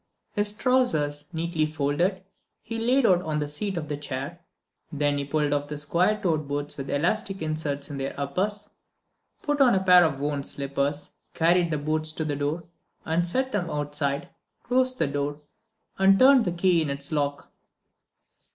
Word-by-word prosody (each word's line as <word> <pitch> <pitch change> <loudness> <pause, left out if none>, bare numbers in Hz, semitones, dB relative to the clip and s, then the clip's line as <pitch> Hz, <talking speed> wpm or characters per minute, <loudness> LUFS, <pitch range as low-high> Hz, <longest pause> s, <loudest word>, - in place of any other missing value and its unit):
His 205 -1 +3
trousers, 160 - +1
neatly 160 -2 -1
folded, 160 +6 0 0.4
he 230 0 -5
laid 250 +3 +3
out 180 -4 +4
on 155 -4 -2
the 150 -1 -1
seat 185 +6 -3
of 155 -2 -4
the 145 -1 -3
chair. 145 +3 -5 0.5
Then 145 -1 0
he 140 - -3
pulled 145 0 0
off 145 0 -1
square 175 +8 +1
toed 155 -6 0
boots 145 +1 -3
with 135 -1 -6
elastic 195 +6 0
inserts 155 -2 -3
in 140 - -5
their 135 +1 -4
uppers, 200 +9 -2 0.7
put 290 -1 0
on 250 -6 +6
a 190 - +1
pair 180 -1 +7
of 150 -5 0
worn 145 0 -2
slippers, 140 +1 -2 0.2
carried 170 +1 +3
the 155 - 0
boots 155 +1 -1
to 160 - -3
the 145 -1 -1
door 145 +4 -2 0.4
and 170 +2 +1
set 260 +8 0
them 180 -6 -1
outside, 145 -1 -2 0.3
closed 255 +1 +1
the - - +2
door, 145 +1 -2 0.6
and 195 0 +6
turned 260 0 +6
the 180 - 0
key 175 0 +2
in 155 - -1
its 140 +1 -4
lock. 145 -2 -2
155 Hz, 170 wpm, -26 LUFS, 145-190 Hz, 0.7 s, pair